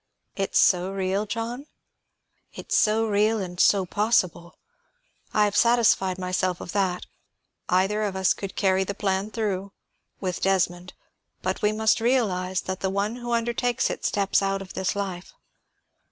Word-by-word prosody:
"It's 195 Hz, -1 st, -1 dB
so 180 Hz, 0 st, +4 dB
real, 195 Hz, +2 st, -1 dB
John?" 230 Hz, +6 st, -4 dB, 0.9 s
"It's -, -, -3 dB
so 220 Hz, +1 st, +3 dB
real 215 Hz, +1 st, +2 dB
and 180 Hz, -3 st, -5 dB
so 195 Hz, -1 st, +4 dB
possible. 185 Hz, -4 st, 0 dB, 0.7 s
I 210 Hz, -, +3 dB
have 205 Hz, -1 st, -2 dB
satisfied 230 Hz, -6 st, +3 dB
myself 185 Hz, -1 st, -1 dB
of -, -, -7 dB
that. 185 Hz, -2 st, -1 dB, 0.6 s
Either 195 Hz, +4 st, +2 dB
of 205 Hz, -3 st, -2 dB
us 190 Hz, -1 st, +3 dB
could 195 Hz, -1 st, -7 dB
carry 190 Hz, -1 st, +2 dB
the 200 Hz, +1 st, -5 dB
plan 195 Hz, +1 st, -1 dB
through, 200 Hz, -3 st, -3 dB, 0.5 s
with 185 Hz, -3 st, -3 dB
Desmond; 180 Hz, -2 st, 0 dB, 0.5 s
but 185 Hz, +1 st, -2 dB
we 210 Hz, -, +3 dB
must 220 Hz, +1 st, +2 dB
realize 190 Hz, -7 st, +1 dB
that 190 Hz, 0 st, -5 dB
the 190 Hz, -, -1 dB
one 200 Hz, +4 st, -1 dB
who 240 Hz, -1 st, -4 dB
undertakes 235 Hz, +1 st, 0 dB
it -, -, -6 dB
steps 200 Hz, -1 st, +1 dB
out 195 Hz, 0 st, 0 dB
of 190 Hz, -, -12 dB
this 190 Hz, +1 st, -1 dB
life. 190 Hz, -3 st, -5 dB
195 Hz, 155 wpm, -25 LUFS, 185-215 Hz, 0.9 s, so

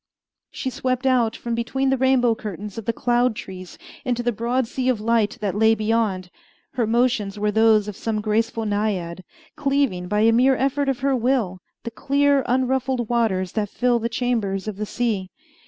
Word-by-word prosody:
She 260 Hz, -, -4 dB
swept 255 Hz, +1 st, -2 dB
out 245 Hz, -4 st, +2 dB
from 235 Hz, -, -4 dB
between 265 Hz, +3 st, 0 dB
the 270 Hz, -, +2 dB
rainbow 255 Hz, -2 st, +3 dB
curtains 210 Hz, -1 st, -7 dB
of 220 Hz, -, -9 dB
the 230 Hz, -, +1 dB
cloud 240 Hz, 0 st, +1 dB
trees 185 Hz, -3 st, -9 dB, 0.3 s
into 245 Hz, -3 st, -1 dB
the 240 Hz, -, +1 dB
broad 240 Hz, +3 st, -1 dB
sea 255 Hz, +2 st, -2 dB
of 245 Hz, -4 st, +1 dB
light 225 Hz, -1 st, +1 dB
that 200 Hz, -3 st, -1 dB
lay 220 Hz, +2 st, +4 dB
beyond. 215 Hz, -4 st, -1 dB, 0.4 s
Her 240 Hz, -4 st, -1 dB
motions 230 Hz, -3 st, +1 dB
were 210 Hz, 0 st, 0 dB
those 220 Hz, -1 st, +4 dB
of 210 Hz, -, -5 dB
some 220 Hz, +1 st, -2 dB
graceful 225 Hz, +2 st, -1 dB
naiad, 200 Hz, -4 st, -2 dB, 0.3 s
cleaving, 275 Hz, -11 st, 0 dB
by 210 Hz, +2 st, +1 dB
a 225 Hz, +1 st, +5 dB
mere 255 Hz, +3 st, +4 dB
effort 275 Hz, +2 st, 0 dB
of 265 Hz, -2 st, -2 dB
her 275 Hz, 0 st, +2 dB
will, 235 Hz, -7 st, 0 dB, 0.2 s
the 235 Hz, -, -5 dB
clear, 280 Hz, +3 st, +2 dB
unruffled 255 Hz, -1 st, 0 dB
waters 200 Hz, -7 st, 0 dB
that 210 Hz, -2 st, -2 dB
fill 245 Hz, +1 st, +1 dB
the 230 Hz, +1 st, -2 dB
chambers 225 Hz, -5 st, -1 dB
of 210 Hz, -2 st, -4 dB
the 210 Hz, 0 st, -4 dB
sea. 210 Hz, -7 st, -2 dB
230 Hz, 185 wpm, -22 LUFS, 210-255 Hz, 0.4 s, a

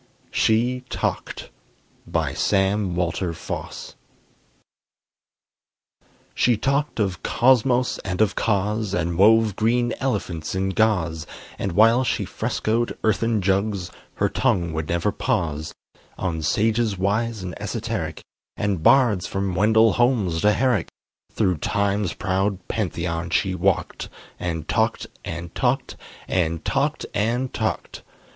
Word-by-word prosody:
SHE 125 Hz, +3 st, +2 dB
TALKED -, -, -3 dB, 0.6 s
BY -, -, -1 dB
SAM 95 Hz, -2 st, +1 dB
WALTER 85 Hz, 0 st, -1 dB
FOSS 80 Hz, -, -6 dB, 2.4 s
She 120 Hz, -3 st, +2 dB
talked 140 Hz, +4 st, 0 dB
of 95 Hz, -4 st, -1 dB
Cosmos 125 Hz, 0 st, +3 dB
and 90 Hz, -1 st, -4 dB
of 105 Hz, -3 st, +3 dB
Cause, 105 Hz, 0 st, 0 dB
And 85 Hz, 0 st, -1 dB
wove 110 Hz, +2 st, +5 dB
green 120 Hz, +3 st, +1 dB
elephants 95 Hz, -11 st, -2 dB
in 95 Hz, 0 st, 0 dB
gauze, 90 Hz, -6 st, +1 dB, 0.3 s
And 95 Hz, -, -2 dB
while 115 Hz, +6 st, +5 dB
she 125 Hz, -, -1 dB
frescoed 115 Hz, +2 st, -1 dB
earthen 110 Hz, 0 st, +1 dB
jugs, 95 Hz, -1 st, 0 dB, 0.2 s
Her -, -, +2 dB
tongue 85 Hz, -3 st, 0 dB
would 80 Hz, -1 st, -3 dB
never 85 Hz, 0 st, +1 dB
pause: 75 Hz, 0 st, -1 dB, 0.5 s
On 85 Hz, -4 st, -2 dB
sages 110 Hz, +5 st, +1 dB
wise 105 Hz, +2 st, -1 dB
and 90 Hz, -1 st, -5 dB
esoteric, -, -, -3 dB, 0.3 s
And 100 Hz, -5 st, -1 dB
bards 110 Hz, -3 st, +4 dB
from 95 Hz, -1 st, -2 dB
Wendell 110 Hz, +4 st, +4 dB
Holmes 110 Hz, -10 st, +1 dB
to 105 Hz, 0 st, +4 dB
Herrick: 125 Hz, -7 st, +1 dB, 0.4 s
Thro' 90 Hz, -3 st, +1 dB
time's 100 Hz, +3 st, 0 dB
proud 95 Hz, 0 st, -1 dB
Pantheon 85 Hz, -4 st, -2 dB
she 95 Hz, 0 st, +1 dB
walked, 90 Hz, -, -1 dB, 0.3 s
And 80 Hz, -3 st, -3 dB
talked -, -, 0 dB, 0.2 s
and 85 Hz, +1 st, -6 dB
talked 125 Hz, 0 st, 0 dB, 0.3 s
and 85 Hz, -3 st, -1 dB
talked -, -, 0 dB
and 120 Hz, +5 st, 0 dB
talked! -, -, -3 dB
100 Hz, 120 wpm, -23 LUFS, 90-115 Hz, 2.4 s, wove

